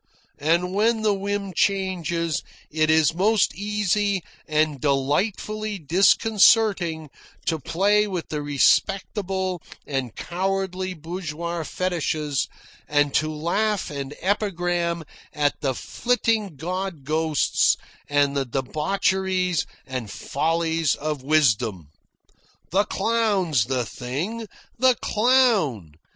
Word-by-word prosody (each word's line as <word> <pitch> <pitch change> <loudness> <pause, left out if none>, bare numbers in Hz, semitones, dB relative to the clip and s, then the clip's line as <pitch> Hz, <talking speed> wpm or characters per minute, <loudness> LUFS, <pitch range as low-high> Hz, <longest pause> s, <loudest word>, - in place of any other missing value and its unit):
And, 170 +5 +1
when 220 +2 +2
the 210 -1 +3
whim 200 0 -3
changes, 175 -4 0 0.3
it 155 0 +1
is 160 0 +4
most 205 +4 +2
easy 205 -1 0 0.2
and 155 -3 +1
delightfully 200 +10 0
disconcerting 190 - +3 0.3
to 160 -2 0
play 205 +8 +2
with 185 -4 -4
the 150 -1 -3
respectable 185 +5 +1 0.2
and 135 -5 -3
cowardly 185 0 -2
bourgeois 170 0 -4
fetishes 155 -5 -1 0.4
and 145 -1 +2
to 155 +1 +1
laugh 180 +5 -1
and 140 0 -5
epigram 175 -3 0 0.3
at 145 -1 0
the 135 -3 0
flitting 225 - 0
god 180 +1 -4
ghosts 155 +1 +2 0.3
and 145 -1 +2
the 140 - +1
debaucheries 180 +6 0 0.2
and 130 -5 -5
follies 160 +5 0
of 150 -2 -3
wisdom. 115 - +1 0.8
The 200 +4 +3
clown's 200 - +1
the 125 -1 -1
thing! 170 - -4 0.3
The 255 0 +5
clown! 210 - +2
170 Hz, 100 wpm, -24 LUFS, 150-200 Hz, 0.8 s, The